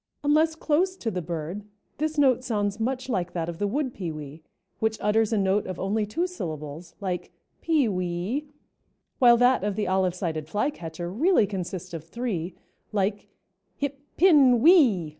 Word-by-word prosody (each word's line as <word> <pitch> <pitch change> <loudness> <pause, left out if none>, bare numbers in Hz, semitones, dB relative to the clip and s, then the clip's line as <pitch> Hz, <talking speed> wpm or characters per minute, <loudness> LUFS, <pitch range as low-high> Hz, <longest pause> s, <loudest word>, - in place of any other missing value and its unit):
Unless 310 +2 +3
close 335 +4 +1
to 225 - -3
the 180 - -3
bird, 170 +4 -5 0.4
this 310 0 -1
note 260 -3 +4
sounds 205 -4 -1
much 255 +3 -2
like 180 -8 -2
that 165 -2 -2
of 170 -1 -6
the 205 - +1
wood 260 +3 -1
pewee, 155 -4 -6 0.4
which 220 0 0
utters 215 +1 +2
a 220 - +2
note 195 +1 +1
of 185 -2 -5
only 210 +2 0
two 330 - -1
syllables, 160 - -6
like 185 -3 -4 0.3
"pee 310 -6 +2
wee," 185 +9 -2 0.7
while 240 -2 +7
that 245 -2 +4
of 205 -1 -1
the 210 0 -1
Olive 185 -1 +1
sided 160 -4 -3
Flycatcher 175 - -3
really 295 - +3
consists 185 -2 -5
of 165 -2 -5
three, 185 -2 -4 0.4
like 205 0 -1 0.5
"hip 280 -1 -3 0.2
pin 285 -9 +6
whee." 250 - +5
205 Hz, 160 wpm, -26 LUFS, 180-260 Hz, 0.7 s, while